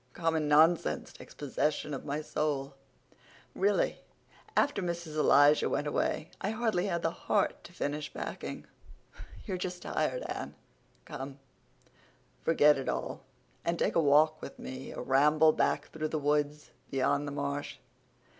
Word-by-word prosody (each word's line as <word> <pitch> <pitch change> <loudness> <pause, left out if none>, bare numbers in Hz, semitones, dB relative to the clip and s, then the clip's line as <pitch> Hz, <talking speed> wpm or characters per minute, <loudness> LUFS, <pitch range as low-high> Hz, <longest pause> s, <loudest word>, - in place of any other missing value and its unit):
Common 160 -3 0
nonsense 155 - +3
takes - - -13
possession 150 +1 -1
of 135 - -5
my 145 +1 -2
soul. 140 -3 -2 0.8
Really, 200 +1 +1 0.6
after 285 -8 +2
Mrs. 170 -3 -4
Elisha 145 0 +5
went 145 - -1
away 150 +2 -1
I 195 - -1
hardly 215 -4 0
had 170 -3 -1
the 165 - +1
heart 200 +3 0
to - - -11
finish 150 -3 -3
packing." - - -6 0.8
"You're 190 -4 -2
just 180 -1 -4
tired, - - -1
Anne. - - -5 0.5
Come, 135 +1 -7 1.0
forget 150 -3 +5
it 135 - -3
all - - -3 0.4
and 170 0 0
take - - +1
a 165 - +4
walk 155 +1 +4
with - - -8
me—a 130 +1 -7
ramble 150 +5 +4
back - - 0
through 155 -1 -3
the 155 - -2
woods 150 0 0 0.2
beyond 140 +2 +1
the - - -4
marsh. 140 0 -3
150 Hz, 140 wpm, -31 LUFS, 145-170 Hz, 1.0 s, Elisha